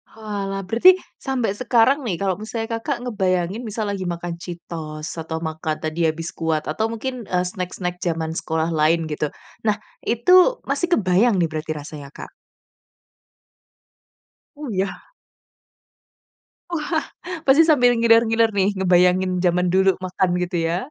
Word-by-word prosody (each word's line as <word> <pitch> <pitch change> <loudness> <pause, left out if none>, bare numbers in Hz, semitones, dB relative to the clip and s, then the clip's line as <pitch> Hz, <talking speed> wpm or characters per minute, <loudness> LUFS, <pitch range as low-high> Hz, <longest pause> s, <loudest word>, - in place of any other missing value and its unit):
Oalah, 200 -3 -4
berarti 235 - +6 0.2
sampai 255 -6 -1
sekarang 245 +5 +3
nih, 190 - 0
kalau 190 +1 -1
misalnya 225 +1 -4
Kakak 245 +1 -3
ngebayangin, 190 -4 -1
misal 215 -1 -3
lagi 190 -2 -3
makan 170 0 -4
Cheetos, 165 -3 -7
atau 160 0 -5
makan 160 0 -3
tadi 160 +1 0
ya, 155 - +3
Biskuat 165 -2 -2
atau 220 +8 0
mungkin, 235 0 -5
eee, 180 0 +1
snack-snack 180 0 -4
jaman 165 -3 -2
sekolah 160 0 -2
lain, 160 +1 +2
gitu. 150 0 -1 0.4
Nah, 210 - +3 0.2
itu 365 - +4
masih 350 - -1
kebayang 195 +3 +3
nih, 170 -3 +1
berarti 155 0 -4
rasanya 145 -1 -8
Kak? - - -9 2.2
Oh, 295 -2 -7
iya? 195 0 -3 1.6
Wah, 320 0 -1 0.5
pasti 285 +5 +7
sambil 250 -7 +4
ngiler-ngiler 230 0 +4
nih, 195 -1 +2
ngebayangin 180 0 +3
jaman 180 0 +2
dulu 190 0 +4
makan, 185 0 -1 0.2
gitu 175 0 -4
ya? 170 - 0
190 Hz, 135 wpm, -22 LUFS, 170-230 Hz, 2.2 s, pasti